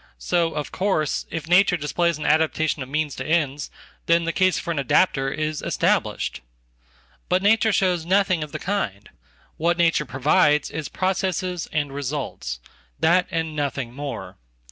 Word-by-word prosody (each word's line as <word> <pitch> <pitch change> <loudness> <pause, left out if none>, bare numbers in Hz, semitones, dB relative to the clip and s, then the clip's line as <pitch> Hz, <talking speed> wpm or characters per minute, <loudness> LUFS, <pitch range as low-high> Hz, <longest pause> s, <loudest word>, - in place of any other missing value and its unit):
So, 165 - 0
of 150 -1 -4
course, 185 -6 0
if 160 -1 -5
nature 180 +1 +4
displays 170 +2 0
an 155 - -6
adaptation 155 -1 +1
of 130 - -6
means 150 -1 -1
to 130 - -3
ends, 145 -2 0 0.4
then 170 0 +4
the 165 0 -2
casefor 185 -2 +1
an 160 - -1
adapter 135 0 +2
is 155 +1 -3
established. 65 +1 0 0.9
But 185 +1 +2
nature 220 +2 +4
shows 180 -4 +1
nothing 185 -1 +2
of 150 - -8
the - - -4
kind. 110 - -3 0.5
What 170 +2 +1
nature 165 -3 +2
provides 145 +2 +2
isprocesses 185 +2 -2
and 145 -3 -1
results. 140 - -4 0.4
That 180 +2 +3
and 160 -1 -2
nothing 140 -4 -3
more. 140 +1 -6
160 Hz, 145 wpm, -23 LUFS, 145-180 Hz, 0.9 s, nature